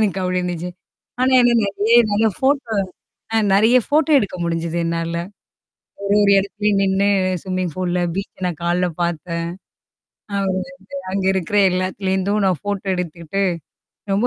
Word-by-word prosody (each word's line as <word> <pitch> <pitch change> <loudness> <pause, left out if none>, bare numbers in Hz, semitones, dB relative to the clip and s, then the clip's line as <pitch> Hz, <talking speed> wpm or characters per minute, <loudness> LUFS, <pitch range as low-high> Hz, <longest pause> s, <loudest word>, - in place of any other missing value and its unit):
எனக்கு 195 -3 +1
அப்டி 180 0 0
இருந்துச்சு. 180 0 -3 0.5
ஆனா 260 +1 +3
என்னா? 240 -1 +4
நெறையா 205 +4 +2
நல்லா 220 +2 +3
ஃபோட்டோ 265 -4 +1 0.6
அ - - +4 0.2
நெறையா 225 +5 +5
ஃபோட்டோ 305 +1 +2
எடுக்க 200 -6 -2
முடிஞ்சுது. 170 0 -2
என்னால. 165 0 -2 0.9
ஒரு 200 +1 +2
ஒரு 200 - +4
எடத்துலயும் 205 +1 0
நின்னு 195 +1 +2 0.3
ஸ்விம்மிங் 185 -3 -3
பூல்ல 180 -1 -1 0.2
பீச்ச 195 - -5
நான் 175 -3 -3
காலைல 175 +1 +1
பாத்தேன். 170 0 -2 0.9
அப்றமேட்டு 190 -2 -1 0.4
அங்க 195 -1 -1
இருக்கிற 190 +2 -2
எல்லாத்துலருந்தும் 190 +2 -1
நான் 185 -4 +1
ஃபோட்டோ 205 -1 -4
எடுத்துக்கிட்டு, 175 +2 -3 0.7
ரொம்ப 210 +5 +2
190 Hz, 135 wpm, -20 LUFS, 180-205 Hz, 0.9 s, நெறையா